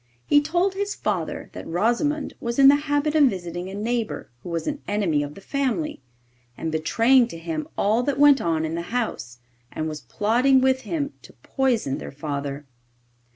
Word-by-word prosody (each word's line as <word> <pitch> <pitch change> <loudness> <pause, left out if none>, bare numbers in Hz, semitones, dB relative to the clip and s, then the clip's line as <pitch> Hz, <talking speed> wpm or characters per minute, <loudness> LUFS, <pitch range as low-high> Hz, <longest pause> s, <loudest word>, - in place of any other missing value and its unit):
He 290 - +5
told 350 +6 +1
his 405 +1 -2
father - - -3
that - - -8
Rosimond 240 - 0
was 235 0 -3
in 275 0 +8
the 285 - +7
habit 290 +1 +1
of 305 -2 +6
visiting 175 -5 -2
a 195 - -7
neighbour 225 - -3
who - - -8
was 165 -1 -2
an 295 -1 -3
enemy 195 -8 +1
of 145 0 -5
the - - -12
family, 280 - -2 0.6
and 160 - -3
betraying 230 +11 +3
to 200 - -8
him 165 -2 -4
all 215 +4 +2
that 275 +2 -1
went 285 -1 +6
on 160 -1 0
in 160 - -3
the 170 - -2
house, 225 - -3 0.3
and 155 - -3
was 155 -1 -5
plotting 245 +6 +2
with 260 0 +2
him 290 -2 -3
to - - -15
poison 245 - 0
their - - -7
father. 140 0 -5
235 Hz, 185 wpm, -24 LUFS, -, 0.6 s, in